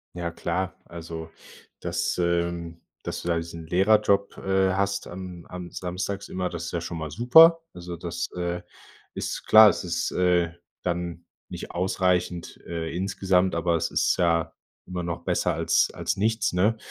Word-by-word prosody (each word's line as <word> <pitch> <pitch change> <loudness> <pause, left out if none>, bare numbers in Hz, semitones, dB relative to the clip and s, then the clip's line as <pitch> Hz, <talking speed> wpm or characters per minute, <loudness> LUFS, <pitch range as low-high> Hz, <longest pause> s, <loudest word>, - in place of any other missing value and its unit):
Ja 85 -1 -3
klar. 95 +3 -2
Also, 80 -1 -8 0.5
das, - - -1
ähm 85 -1 -1 0.2
dass - - -4
du 85 - -4
da 85 - +2
diesen 85 0 -6
Lehrerjob, 100 +2 +3
äh, 95 -1 +2
hast 100 +1 -1
am 90 -1 -8
am 90 -1 -7
samstags 95 +2 -4
immer. 90 -1 -2
Das 85 0 -5
ist - - -5
ja 85 - -1
schon 85 0 -5
mal 80 -1 -4
super. 160 - +7
Also, 90 0 -7
das, 85 0 -4
äh, 90 0 -2 0.5
ist - - -4
klar. 110 0 +10
Das - - +1
ist, 85 -1 -1
äh, 90 -2 +2 0.3
dann 85 -1 -3 0.2
nicht - - -7
ausreichend, 90 -1 0
äh, 80 -1 -4
insgesamt. 95 0 +1
Aber 85 0 +1
es - - -2
ist - - +2
ja 85 -2 +1 0.3
immer 90 -1 -4
noch 85 0 -4
besser - - +1
als - - +2
als - - -2
nichts, 110 +2 +1
ne? 100 +5 +3
90 Hz, 165 wpm, -26 LUFS, 85-95 Hz, 0.5 s, klar